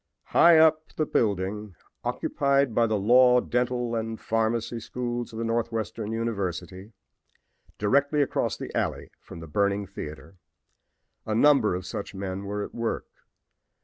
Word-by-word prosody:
High 170 -1 +6
up 155 0 +5
in - - -22
the 155 - 0
building 105 - -1 0.3
occupied 140 -3 +1
by 115 +1 +3
the 110 -1 0
law, 125 +4 +5
dental 125 -1 -1
and 115 -1 -3
pharmacy 115 +1 -1
schools 120 +1 -4
of 110 - -9
the 115 - -2
Northwestern 115 -2 -2
University, 100 -3 -4 0.8
directly 140 +7 +2
across - - -1
the - - -7
alley - - -2
from 85 - -11
the 80 - -9
burning 100 +4 0
theater, 80 -2 -9 0.9
a 110 - 0
number 130 -6 +4
of 90 0 -5
such 100 +2 -6
men 95 0 -5
were 105 +1 -3
at - - -8
work. 115 -1 -2
115 Hz, 145 wpm, -26 LUFS, 100-125 Hz, 0.9 s, High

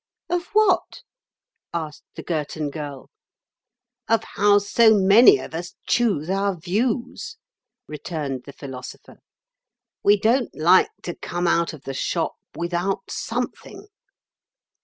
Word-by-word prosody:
"Of 355 0 0
what?" 430 0 +2 0.7
asked 155 -3 -5
the - - -7
Girton 155 -2 -3
Girl. 145 -2 -7 1.0
"Of 225 0 +3
how 205 0 +4
so 220 +2 +4
many 210 - +7
of - - -9
us 175 +2 -6
choose 210 -11 +1
our 195 +1 0
views," 235 - -2 0.5
returned 150 -4 -5
the 140 - -10
Philosopher; 130 -2 -10 0.8
"we 205 0 +4
don't 235 +4 +1
like 170 +4 +5
to 175 - -4
come 175 +1 -4
out 170 0 +2
of 155 -4 -12
the 135 - -5
shop 135 - -1 0.2
without 175 +3 -2
something." 415 - -5
180 Hz, 115 wpm, -23 LUFS, 155-220 Hz, 1.0 s, many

